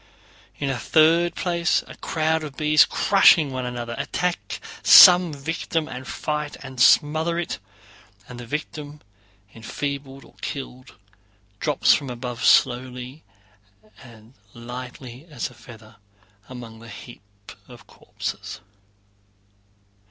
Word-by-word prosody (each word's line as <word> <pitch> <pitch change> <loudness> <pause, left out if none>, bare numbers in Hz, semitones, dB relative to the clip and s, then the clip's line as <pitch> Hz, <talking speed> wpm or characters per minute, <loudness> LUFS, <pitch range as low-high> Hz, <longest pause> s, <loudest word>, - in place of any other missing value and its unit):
In 140 -2 -2
a 125 - -4
third 165 +2 +3
place 170 -1 0
a - - -12
crowd 160 0 -1
of 145 -3 -9
bees, 155 0 +4
crushing 170 -7 +4
one 130 -1 -4
another, 120 -1 -5
attack 180 -1 -3 0.2
some 180 -2 +8
victim 155 +2 -3
and 130 0 -8
fight 150 -1 -4
and 130 -2 -6
smother 155 +4 +3
it, 175 - -4 0.7
and 125 -1 -10
the 120 - -9
victim, 150 +1 -6 0.5
enfeebled 135 +3 -6
or - - -20
killed, 130 -2 -7 0.6
drops 150 -3 +3
from 140 -3 -2
above 120 -1 -6
slowly 125 +3 +1 0.8
and 115 -2 -16 0.2
lightly 125 +3 -9
as 135 -6 -5
a - - -16
feather, 110 -1 -15 0.5
among 120 -3 -10
the 115 0 -13
heap 115 +2 -12 0.5
of - - -15
corpses. - - -8
135 Hz, 115 wpm, -23 LUFS, 125-155 Hz, 0.8 s, some